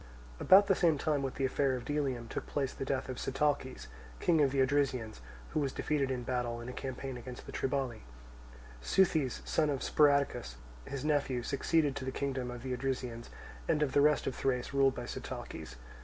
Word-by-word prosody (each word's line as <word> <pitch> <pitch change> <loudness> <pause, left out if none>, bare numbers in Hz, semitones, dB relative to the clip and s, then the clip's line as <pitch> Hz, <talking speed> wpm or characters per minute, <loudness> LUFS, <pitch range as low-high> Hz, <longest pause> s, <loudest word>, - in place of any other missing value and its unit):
About 195 +2 +7
the 195 - +4
same 170 -5 +3
time 145 0 0
with 135 -1 -3
the 135 - 0
affair 135 0 +1
of 125 - -6
Delium 135 -5 -1
took - - -5
place 140 -3 -1
the - - -5
death 135 0 -1
of 130 -2 -5
Sitalces, 135 - -1 0.3
king 165 -3 +3
of 140 - +4
the 135 - 0
Odrysians, 130 - +1 0.3
who - - -1
was 140 -3 0
defeated 140 -2 0
in 125 -2 -2
battle, 120 -1 -2
in 120 - -7
a 125 - -5
campaign 130 0 -5
against 125 +1 -9
the - - -8
Triballi; 135 -4 -2 0.8
Seuthes, 155 - +2
son 155 -2 +2
of 140 -2 -1
Sparadocus, 140 - +2 0.3
his 140 0 -5
nephew, 140 -5 +1
succeeding 145 +3 +1
to 135 - -5
the 130 - -2
kingdom 130 -2 -2
of 120 0 -7
the 130 -1 -2
Odrysians, 125 -2 -3 0.4
and 155 -2 +3
of 140 - 0
the 145 - +4
rest 150 +1 +4
of 135 - -1
Thrace 130 0 -1
ruled 135 -1 +4
by - - -5
Sitalces. 65 - -7
135 Hz, 195 wpm, -32 LUFS, 125-145 Hz, 0.8 s, About